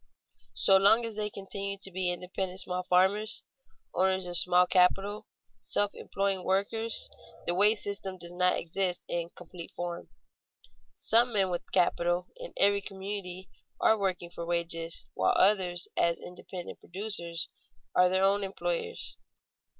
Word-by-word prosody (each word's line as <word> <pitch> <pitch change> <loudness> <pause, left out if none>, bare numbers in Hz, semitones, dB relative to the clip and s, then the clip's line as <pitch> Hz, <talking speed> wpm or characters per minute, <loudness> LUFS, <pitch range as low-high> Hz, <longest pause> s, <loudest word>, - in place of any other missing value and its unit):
So 195 - +5
long 210 +5 +5
as 225 -2 -5
they 210 0 -2
continue 200 0 -5
to 195 0 -6
be 185 0 -1
independent 185 +1 -4
small 180 -1 -3
farmers, 190 +4 +1 0.5
owners 190 0 +1
of 175 0 0
small 180 +1 +6
capital, 195 +3 +2 0.3
self 205 0 +1
employing 195 -2 -2
workers, 210 +5 0 0.4
the 175 - 0
wage 210 +4 +5
system 195 -2 -4
does 175 -1 -7
not 180 0 +3
exist 180 +1 -2
in 170 -1 -3
complete 175 -1 -9
form. 175 -1 -5 0.9
Some 235 - +4
men 195 -3 +1
with 175 - -5
capital 175 0 +1
in - - -8
every 200 0 +4
community 190 -2 -6 0.3
are 220 - +4
working 185 -4 -2
for 170 - -6
wages, 170 -1 -1
while - - +2
others, 185 -3 +3
as 170 0 +2
independent 180 0 -9
producers, 175 -3 -4 0.5
are 180 0 +5
their 190 +1 +1
own 200 +1 +3
employers. 465 - -3
190 Hz, 140 wpm, -29 LUFS, 175-200 Hz, 0.9 s, small